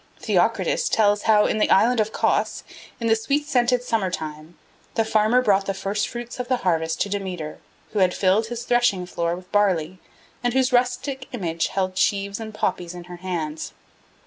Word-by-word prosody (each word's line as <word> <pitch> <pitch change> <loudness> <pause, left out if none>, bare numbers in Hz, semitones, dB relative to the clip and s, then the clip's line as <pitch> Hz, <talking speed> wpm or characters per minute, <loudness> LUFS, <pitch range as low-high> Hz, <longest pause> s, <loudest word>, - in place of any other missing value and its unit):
Theocritus - - +1
tells 205 -1 +3
how 210 -1 +6
in 215 - 0
the - - +2
island 240 +4 +4
of 215 0 +1
Cos, - - 0 0.4
in 230 - -3
the 225 -1 +4
sweet 280 +7 -1
scented 245 -2 +2
summer 225 -6 0
time, 155 -1 -6 0.4
the 225 - +2
farmer 220 +3 +3
brought 200 -3 +2
the 195 - -1
first 200 +2 -1
fruits 240 +1 -7
of 250 - -3
the 255 0 +1
harvest 160 -2 +1
to 200 - 0
Demeter 185 -6 -4 0.3
who 210 - 0
had 185 -1 +3
filled 200 +4 +2
his 235 0 -5
threshingfloor 180 -8 +1
with 180 +1 -13
barley, 185 -4 +1 0.4
and 245 0 0
whose 260 -1 +2
rustic 255 +2 0
image 170 -8 -1
held 185 -1 -2
sheaves 200 +1 0
and 220 -1 -6
poppies 180 -4 -2
in 175 - -8
her 175 0 -10
hands. 165 -4 -4
205 Hz, 180 wpm, -23 LUFS, 180-240 Hz, 0.4 s, how